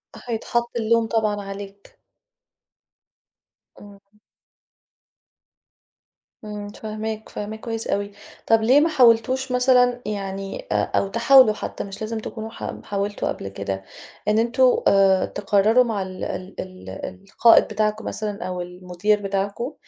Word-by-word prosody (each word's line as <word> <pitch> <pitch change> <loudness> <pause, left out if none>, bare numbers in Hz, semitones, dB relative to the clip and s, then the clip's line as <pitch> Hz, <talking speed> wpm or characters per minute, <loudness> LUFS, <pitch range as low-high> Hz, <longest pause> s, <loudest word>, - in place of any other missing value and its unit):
فهيتحط 235 0 -2
اللوم 230 0 +2
طبعًا 215 -2 0
عليك. 195 0 -10 1.8
إمم. 200 -1 -14 2.4
إمم، 210 -1 -6
فاهماك، 215 +1 -6
فاهماك 215 +1 -6
كويس 225 0 -5
أوي. 200 0 -1 0.4
طَب 225 0 +4
ليه 250 +6 +5
ما 320 +3 +3
حاولتوش 255 -1 +3
مثلًا 250 -1 +3
يعني 195 -2 -5
أ - - +1
أو - - 0
تحاولوا 235 +2 +6
حتى - - -5
مش 195 0 -9
لازم 220 +1 -3
تكونوا 220 0 -6
حا 225 - -7
حاولتوا 205 0 -2
قبل - - -4
كده 95 0 -5 0.4
إن 210 +1 +3
أنتم 235 +3 +2 0.2
آآ، 195 -1 +4
تقرّروا 210 +4 +3
مع 220 -5 -2
ال 185 -1 -6
ال 185 +1 -5
ال 185 0 -8 0.4
القائد 230 +3 +6
بتاعكم 215 0 -2
مثلًا 210 -1 -4
أو 180 -1 -4
المدير 180 +4 -1
بتاعكم 200 +6 -2
215 Hz, 125 wpm, -23 LUFS, 195-230 Hz, 2.4 s, تحاولوا